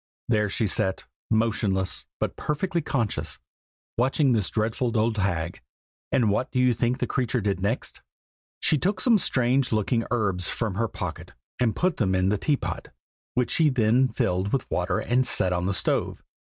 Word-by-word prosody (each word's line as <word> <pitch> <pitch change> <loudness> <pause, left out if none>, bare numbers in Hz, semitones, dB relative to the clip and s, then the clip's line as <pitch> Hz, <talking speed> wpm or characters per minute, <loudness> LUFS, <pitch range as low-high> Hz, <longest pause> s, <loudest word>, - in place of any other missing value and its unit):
There 105 -3 +2
she 110 - 0
sat, 95 -1 0 0.3
motionless, 110 -4 0
but - - -2
perfectly 170 +3 -1
conscious, 120 -7 -2 0.6
watching 135 +2 +3
this 110 -5 +1
dreadful 115 +2 -1
old 110 0 +1
hag. 85 -3 -1 0.5
And 115 -6 +3
what 120 +5 -1
do - - -2
you 125 -1 +4
think 120 +2 0
the - - -1
creature 125 -2 -1
did 100 -3 -1
next? 105 +6 -3 0.6
She 155 - +3
took 185 +4 0
some 225 +1 +4
strange 130 -3 +1
looking 115 +2 +1
herbs 100 -7 0
from 110 -4 -2
her 115 +4 0
pocket, - - -6 0.3
and 120 -3 +1
put 180 -1 0
them 95 -5 +1
in 95 +1 +2
the 105 0 0
teapot, 145 +3 -1 0.5
which 125 -1 +1
she 160 -2 +4
then 125 0 +3
filled 95 -4 -1
with 135 - -2
water 90 +1 0
and 125 +1 +1
set 90 -1 +3
on 90 +1 -1
the - - +1
stove. - - 0
115 Hz, 170 wpm, -25 LUFS, 100-130 Hz, 0.6 s, you